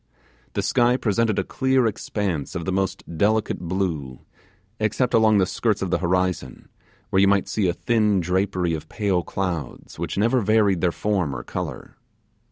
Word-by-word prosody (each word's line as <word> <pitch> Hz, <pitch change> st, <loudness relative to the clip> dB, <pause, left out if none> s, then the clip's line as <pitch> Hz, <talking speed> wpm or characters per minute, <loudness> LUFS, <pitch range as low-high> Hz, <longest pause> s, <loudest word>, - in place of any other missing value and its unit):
The -, -, -1 dB
sky 120 Hz, +1 st, +3 dB
presented 110 Hz, -2 st, +1 dB
a -, -, +1 dB
clear 130 Hz, -1 st, +1 dB
expanse 100 Hz, -8 st, -2 dB
of 85 Hz, -2 st, -3 dB
the 95 Hz, -, -1 dB
most 95 Hz, 0 st, -1 dB, 0.2 s
delicate 110 Hz, +1 st, +1 dB
blue, 85 Hz, -8 st, -3 dB, 0.6 s
except 110 Hz, +4 st, 0 dB
along 110 Hz, -2 st, +5 dB
the 95 Hz, -, +4 dB
skirts 105 Hz, +2 st, -1 dB
of 95 Hz, -, -3 dB
the -, -, +2 dB
horizon, 90 Hz, -6 st, -1 dB, 0.4 s
where 95 Hz, -, +3 dB
you 100 Hz, -, +5 dB
might 100 Hz, -1 st, +2 dB
see 105 Hz, -4 st, 0 dB
a 85 Hz, -, +1 dB
thin 105 Hz, -1 st, +1 dB
drapery 90 Hz, 0 st, 0 dB
of 80 Hz, 0 st, -5 dB
pale 100 Hz, -4 st, 0 dB
clouds 85 Hz, -4 st, -5 dB
which -, -, -3 dB
never 115 Hz, +5 st, +3 dB
varied 105 Hz, -4 st, +3 dB
their 90 Hz, -, +2 dB
form 90 Hz, -8 st, -1 dB
or -, -, -5 dB
colour. -, -, -6 dB
95 Hz, 170 wpm, -23 LUFS, 90-110 Hz, 0.6 s, along